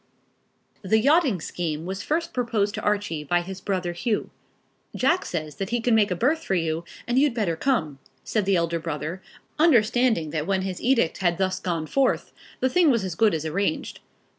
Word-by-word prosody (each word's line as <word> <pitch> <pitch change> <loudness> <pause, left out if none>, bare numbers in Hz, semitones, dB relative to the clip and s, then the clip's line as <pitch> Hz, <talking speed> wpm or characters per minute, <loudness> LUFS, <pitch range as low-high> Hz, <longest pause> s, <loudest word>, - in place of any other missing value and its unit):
The 205 +3 +2
yachting 275 - +3
scheme 160 -1 -4
was 190 +2 -4
first 335 +2 -2
proposed 225 -5 0
to - - -4
Archie 205 -7 -1
by 175 +4 +1
his 190 +2 -8
brother 185 -3 -2
Hugh. 210 +5 -2 0.6
"Jack 330 +8 +2
says 155 -4 -4
that 195 - -3
he 240 - 0
can 235 +1 +1
make 215 -2 +4
a 180 - -1
berth 300 - +1
for 195 - 0
you, 165 -1 -1 0.2
and 240 +2 +2
you'd 280 -3 +2
better 200 -8 0
come," 160 - -1 0.2
said 215 -3 -1
the 195 0 +3
elder 170 -1 0
brother, 165 +2 -4 0.4
understanding 240 - +3
that 155 0 -2
when 190 -1 +1
his 185 -2 -4
edict 235 -9 +2
had 175 -3 +1
thus 190 -1 0
gone 170 -4 -2
forth, 270 - 0 0.3
the 260 - +3
thing 335 +4 +4
was 230 -6 +2
as 185 -2 -3
good 210 +2 +3
as 155 0 -4
arranged. 160 +1 -2
195 Hz, 190 wpm, -25 LUFS, 170-240 Hz, 0.6 s, make